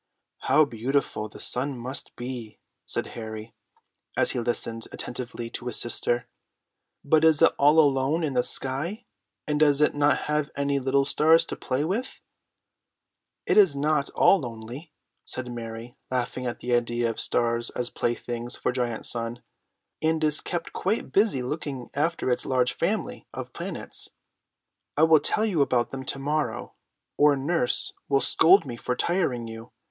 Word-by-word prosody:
"How 155 Hz, -, +4 dB
beautiful 120 Hz, -3 st, -2 dB
the -, -, -13 dB
sun 130 Hz, +2 st, -1 dB
must 130 Hz, +3 st, -6 dB
be!" 120 Hz, -3 st, -7 dB, 0.3 s
said -, -, -1 dB
Harry, 110 Hz, -1 st, -7 dB, 0.6 s
as -, -, +3 dB
he -, -, -2 dB
listened 115 Hz, -1 st, -2 dB
attentively 120 Hz, -1 st, -6 dB
to 125 Hz, -, -5 dB
his 125 Hz, -, 0 dB
sister. 120 Hz, 0 st, -1 dB, 0.8 s
"But 155 Hz, +2 st, +4 dB
is 160 Hz, -2 st, +5 dB
it -, -, +6 dB
all 145 Hz, +3 st, +5 dB
alone 145 Hz, +2 st, +3 dB
in 145 Hz, -3 st, -1 dB
the 125 Hz, -1 st, +2 dB
sky, 155 Hz, -, -2 dB, 0.4 s
and 150 Hz, -1 st, -1 dB
does 145 Hz, -2 st, +4 dB
it 150 Hz, -, +3 dB
not 145 Hz, 0 st, +2 dB
have 150 Hz, -1 st, 0 dB
any 140 Hz, 0 st, 0 dB
little 135 Hz, +1 st, +2 dB
stars 160 Hz, +3 st, +4 dB
to -, -, -5 dB
play 130 Hz, +3 st, -2 dB
with?" 225 Hz, +10 st, -3 dB, 1.3 s
"It -, -, +2 dB
is 190 Hz, -9 st, +6 dB
not 145 Hz, 0 st, +1 dB
at -, -, -19 dB
all 195 Hz, -, +5 dB
lonely," 120 Hz, +4 st, -8 dB, 0.3 s
said 125 Hz, -1 st, -5 dB
Mary, 115 Hz, 0 st, -7 dB
laughing 125 Hz, 0 st, -2 dB
at 120 Hz, -, -5 dB
the 125 Hz, 0 st, -1 dB
idea 120 Hz, 0 st, +1 dB
of 115 Hz, -, -3 dB
the -, -, +1 dB
stars 115 Hz, 0 st, +2 dB
as 125 Hz, -1 st, -4 dB
playthings 120 Hz, 0 st, -2 dB
for -, -, -1 dB
Giant 120 Hz, -3 st, -2 dB
Sun, 115 Hz, 0 st, 0 dB, 0.6 s
"and 160 Hz, 0 st, +1 dB
is 150 Hz, -1 st, +2 dB
kept 175 Hz, -2 st, -4 dB
quite 205 Hz, +5 st, -1 dB
busy 200 Hz, -, +2 dB
looking 140 Hz, -2 st, -5 dB
after 150 Hz, -2 st, 0 dB
its 125 Hz, -, +1 dB
large 125 Hz, -1 st, +2 dB
family -, -, -2 dB
of -, -, -7 dB
planets. -, -, -5 dB, 0.9 s
I 155 Hz, -, +4 dB
will 160 Hz, -1 st, +7 dB
tell 215 Hz, +9 st, +1 dB
you 185 Hz, -9 st, +1 dB
about 125 Hz, -3 st, +1 dB
them 135 Hz, -1 st, -5 dB
to -, -, -2 dB
morrow, 150 Hz, +3 st, -2 dB, 0.4 s
or 145 Hz, -1 st, +5 dB
nurse 140 Hz, -1 st, +1 dB, 0.2 s
will 140 Hz, -, +4 dB
scold 170 Hz, +8 st, +5 dB
me 125 Hz, -3 st, -5 dB
for 125 Hz, -, -2 dB
tiring 130 Hz, -8 st, 0 dB
you. 115 Hz, +1 st, -9 dB
135 Hz, 165 wpm, -26 LUFS, 120-150 Hz, 1.3 s, will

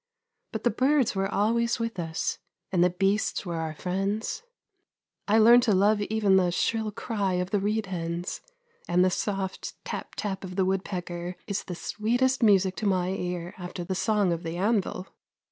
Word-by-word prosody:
But 220 Hz, -, -4 dB
the 240 Hz, -, +3 dB
birds 260 Hz, +2 st, +2 dB
were 195 Hz, 0 st, 0 dB
always 230 Hz, +3 st, +1 dB
with 230 Hz, -5 st, -3 dB
us, 165 Hz, -1 st, -2 dB, 0.3 s
and 180 Hz, -2 st, +3 dB
the 180 Hz, -, +5 dB
beasts 195 Hz, +4 st, 0 dB
were 170 Hz, -2 st, -3 dB
our 160 Hz, -1 st, -3 dB
friends. 195 Hz, -, -2 dB, 0.9 s
I 210 Hz, +2 st, +4 dB
learned 235 Hz, +2 st, +8 dB
to 205 Hz, -, +5 dB
love 205 Hz, +2 st, +3 dB
even 205 Hz, -2 st, +3 dB
the 180 Hz, -2 st, +3 dB
shrill 220 Hz, +4 st, 0 dB
cry 205 Hz, -3 st, -2 dB
of 180 Hz, +1 st, -1 dB
the 205 Hz, -, +2 dB
reed 210 Hz, +2 st, 0 dB
hens, 170 Hz, -1 st, -4 dB, 0.5 s
and 180 Hz, +1 st, +4 dB
the 185 Hz, -, +2 dB
soft 195 Hz, -1 st, -3 dB
tap -, -, -5 dB
tap 195 Hz, -2 st, -3 dB
of 185 Hz, -1 st, -7 dB
the 190 Hz, -1 st, +2 dB
woodpecker 180 Hz, -2 st, -3 dB
is 200 Hz, -1 st, -2 dB
the 180 Hz, -, -5 dB
sweetest 245 Hz, +8 st, 0 dB
music 195 Hz, -4 st, +4 dB
to 215 Hz, -, -1 dB
my 185 Hz, -2 st, +1 dB
ear 180 Hz, -2 st, -3 dB
after 180 Hz, 0 st, -5 dB
the 180 Hz, -, -3 dB
song 205 Hz, -2 st, +2 dB
of 165 Hz, -, -4 dB
the 165 Hz, 0 st, -4 dB
anvil. 195 Hz, -2 st, 0 dB
195 Hz, 180 wpm, -27 LUFS, 180-215 Hz, 0.9 s, learned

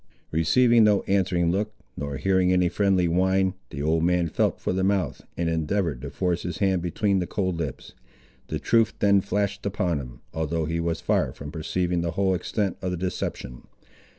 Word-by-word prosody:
Receiving 115 Hz, +9 st, +4 dB
no 105 Hz, -2 st, +4 dB
answering 90 Hz, -3 st, +1 dB
look, 105 Hz, +3 st, -2 dB, 0.2 s
nor 70 Hz, -1 st, -4 dB
hearing 95 Hz, +1 st, +2 dB
any 90 Hz, -1 st, +3 dB
friendly 95 Hz, -3 st, +2 dB
whine, 95 Hz, +2 st, +2 dB, 0.2 s
the 70 Hz, +1 st, -5 dB
old 80 Hz, +2 st, +2 dB
man 90 Hz, -1 st, +2 dB
felt -, -, 0 dB
for -, -, -1 dB
the 95 Hz, 0 st, 0 dB
mouth 95 Hz, -1 st, 0 dB, 0.2 s
and 85 Hz, -, 0 dB
endeavoured 80 Hz, -3 st, -1 dB
to -, -, -5 dB
force 90 Hz, -2 st, -1 dB
his 85 Hz, -2 st, -4 dB
hand 95 Hz, -3 st, +1 dB
between 95 Hz, +3 st, 0 dB
the 90 Hz, -, -2 dB
cold 95 Hz, -4 st, -1 dB
lips. 75 Hz, -5 st, -5 dB, 0.5 s
The -, -, -2 dB
truth 115 Hz, -1 st, +2 dB
then 100 Hz, -1 st, +4 dB
flashed 100 Hz, +1 st, -2 dB
upon 90 Hz, -5 st, -1 dB
him, 60 Hz, -3 st, -10 dB
although 80 Hz, 0 st, -1 dB
he 85 Hz, +2 st, -2 dB
was 85 Hz, -1 st, -2 dB
far -, -, +1 dB
from 75 Hz, +1 st, -8 dB
perceiving 85 Hz, +2 st, -1 dB
the 85 Hz, 0 st, -2 dB
whole 95 Hz, +1 st, +1 dB
extent 95 Hz, +1 st, -2 dB
of 95 Hz, -, -2 dB
the 90 Hz, -, -2 dB
deception. 80 Hz, -8 st, -4 dB
90 Hz, 185 wpm, -25 LUFS, 80-100 Hz, 0.5 s, Receiving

